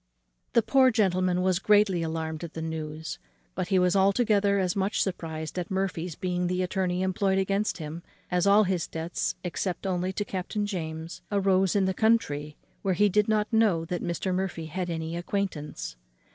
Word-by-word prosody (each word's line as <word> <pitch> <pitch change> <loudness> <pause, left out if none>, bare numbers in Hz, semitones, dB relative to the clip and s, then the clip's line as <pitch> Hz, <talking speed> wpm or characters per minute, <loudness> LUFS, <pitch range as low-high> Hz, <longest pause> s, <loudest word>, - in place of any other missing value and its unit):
The 235 - +4
poor 265 +1 +5
gentleman 185 -5 +2
was 185 -1 +2
greatly 205 -3 +4
alarmed 160 0 -3
at 165 - -7
the 160 - -4
news; 160 -1 -5 0.3
but - - -2
he 190 -1 +2
was 180 +1 +3
altogether 200 0 +3
as 185 -2 0
much 195 +1 0
surprized 160 -3 -4
at 175 - -4
Murphy's 185 -3 -2
being 180 -1 -1
the 180 +1 0
attorney 180 -1 -1
employed 190 +1 +1
against 195 +2 0
him, 160 0 -6 0.3
as 180 +2 +2
all 205 +2 +6
his 185 -4 -1
debts, 165 +2 -3
except 180 +1 -3
only 185 -1 0
to 205 - -2
Captain 200 +3 -3
James, 160 -4 -5
arose 195 -2 +2
in 200 -2 +3
the 190 - +1
country, 150 -10 +1 0.2
where 190 -2 +1
he 205 +3 +4
did 210 +2 +2
not 215 0 +1
know 205 -7 +3
that 175 +1 -3
Mr. 175 +2 -2
Murphy 180 -3 -2
had 180 +3 -3
any 165 0 -3
acquaintance. 170 - -3
185 Hz, 175 wpm, -27 LUFS, 165-200 Hz, 0.3 s, all